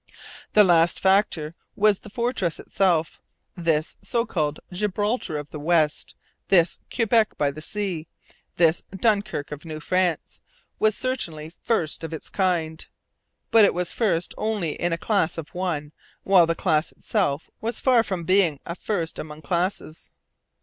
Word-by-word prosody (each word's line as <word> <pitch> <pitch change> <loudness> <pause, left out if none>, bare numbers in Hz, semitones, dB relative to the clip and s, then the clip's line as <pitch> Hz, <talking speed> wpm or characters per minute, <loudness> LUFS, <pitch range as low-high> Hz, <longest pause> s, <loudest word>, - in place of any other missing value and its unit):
The 210 - +7
last 170 -2 +4
factor 190 -5 +2 0.2
was 210 -1 +3
the 210 - -12
fortress 235 -6 -1
itself. 170 -5 0 0.3
This 165 -3 0
so 235 -2 -1
called 155 -8 -2
'Gibraltar 205 -2 -1
of 145 0 -7
the 150 - -6
West,' 155 -1 +1 0.3
this 175 -3 +3
'Quebec 230 -2 +2
by 145 -1 +1
the 155 +2 -9
sea,' 180 -3 -3 0.5
this 165 -1 +4
'Dunkirk 200 -8 0
of 150 -1 -7
New 155 -2 -6
France,' 180 +1 -1 0.4
was 215 -1 +2
certainly 165 -12 -3
first 170 -10 0
of 165 - -5
its - - -8
kind. 170 -4 -1 0.6
But 225 -1 +7
it 200 - +4
was 180 -1 -2
first 185 -7 0
only 210 -7 -1
in 175 +3 -2
a 165 - 0
class 185 -4 0
of 160 -2 -6
one; 165 -5 -3 0.3
while 185 -4 +5
the 165 - 0
class 160 -3 +1
itself 165 -9 -2
was 230 +1 -2
far 255 -3 +4
from 190 -6 -4
being 180 -5 +3
a 170 - -4
first 175 -3 -3
among 155 0 -8
classes. 170 0 -3
175 Hz, 150 wpm, -24 LUFS, 160-205 Hz, 0.6 s, The